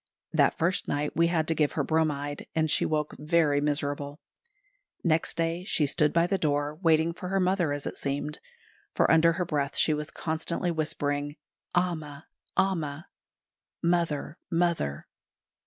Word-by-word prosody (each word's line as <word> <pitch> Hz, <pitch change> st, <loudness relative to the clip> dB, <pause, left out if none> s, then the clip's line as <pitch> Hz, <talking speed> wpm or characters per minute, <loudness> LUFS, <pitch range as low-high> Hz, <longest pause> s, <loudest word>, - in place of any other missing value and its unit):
That -, -, +3 dB
first 180 Hz, +4 st, 0 dB
night 145 Hz, +1 st, -1 dB
we 170 Hz, +1 st, +4 dB
had 165 Hz, -2 st, 0 dB
to 165 Hz, -, +2 dB
give 150 Hz, -2 st, +1 dB
her -, -, 0 dB
bromide, 145 Hz, -3 st, -1 dB
and 160 Hz, -1 st, +2 dB
she -, -, +3 dB
woke 150 Hz, -1 st, -1 dB
very 150 Hz, -2 st, +2 dB
miserable. 145 Hz, 0 st, -2 dB, 0.8 s
Next 165 Hz, -1 st, +1 dB
day 165 Hz, +1 st, -1 dB
she 165 Hz, -5 st, +1 dB
stood 150 Hz, +1 st, +2 dB
by 170 Hz, 0 st, +3 dB
the 190 Hz, +2 st, 0 dB
door 145 Hz, -1 st, 0 dB
waiting 165 Hz, -1 st, +3 dB
for 180 Hz, -, -7 dB
her 195 Hz, 0 st, +1 dB
mother, 180 Hz, -4 st, +2 dB
as 145 Hz, -1 st, -3 dB
it -, -, -5 dB
seemed; 145 Hz, +2 st, -3 dB, 0.6 s
for -, -, +3 dB
under 165 Hz, +1 st, +5 dB
her 180 Hz, +1 st, -1 dB
breath 145 Hz, -3 st, -1 dB
she 155 Hz, -, +4 dB
was 150 Hz, 0 st, -3 dB
constantly 170 Hz, +2 st, -2 dB
whispering, 145 Hz, -2 st, -1 dB, 0.4 s
"Amma! 155 Hz, -5 st, -1 dB, 0.3 s
Amma!" 160 Hz, -4 st, 0 dB, 0.7 s
("Mother! 170 Hz, -3 st, 0 dB
Mother!") 165 Hz, -, 0 dB
155 Hz, 155 wpm, -28 LUFS, 145-170 Hz, 0.8 s, under